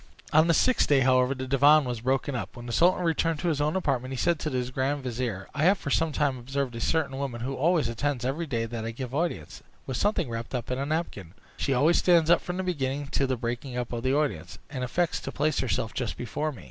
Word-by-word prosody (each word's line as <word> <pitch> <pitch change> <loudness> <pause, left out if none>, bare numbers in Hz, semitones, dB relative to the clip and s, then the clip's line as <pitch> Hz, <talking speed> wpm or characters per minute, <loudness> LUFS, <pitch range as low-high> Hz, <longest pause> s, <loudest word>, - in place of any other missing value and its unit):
On 155 +2 +6
the 170 - +4
sixth 255 +9 +3
day, 140 -2 +5
however, 130 0 +3
after 130 -1 -6
the - - -5
divan 140 +3 +5
was 120 -3 -4
broken 135 +3 0
up, 120 - -5
when 120 -1 -9
the 120 - -5
sultan 180 +7 +3
returned 165 -1 +1
to 175 - +1
his 150 -3 0
own 150 +3 +1
apartment, 135 -8 -1
he 135 - -4
said 170 +3 +1
to 155 - -2
his 125 -2 -2
grand 135 +2 -1
vizier, 120 -6 -3
"I 150 - -3
have 195 +3 +5
for 140 - -5
some 165 +1 +2
time 140 -3 0
observed 130 0 -3
a 115 - -5
certain 140 -1 0
woman, 130 -4 -4
who 130 +3 -3
attends 150 -6 +1
constantly 140 -4 0
every 155 +5 -2
day 115 -5 -1
that 115 -1 -5
I 115 - -3
give 125 +2 -6
audience, 150 - -3 0.2
with 130 - -3
something 205 -6 +1
wrapped 115 +2 -5
up 125 0 -4
in 125 - -1
a 140 - -2
napkin; 130 - -3 0.2
she 135 - 0
always 155 +7 +4
stands 170 -2 +4
up 175 - +5
from 180 0 -5
the 190 - -1
beginning 140 -5 -2
to 140 - +1
the 130 -1 -1
breaking 120 +2 -4
up 125 -1 -3
of 120 - -3
the 130 +2 +1
audience, 150 -1 -2
and 130 -4 -4
affects 170 +7 0
to - - -6
place 150 +1 0
herself 115 -3 -1
just 125 -4 -3
before 150 +5 -3
me. 130 - -11
135 Hz, 260 wpm, -27 LUFS, 125-155 Hz, 0.2 s, On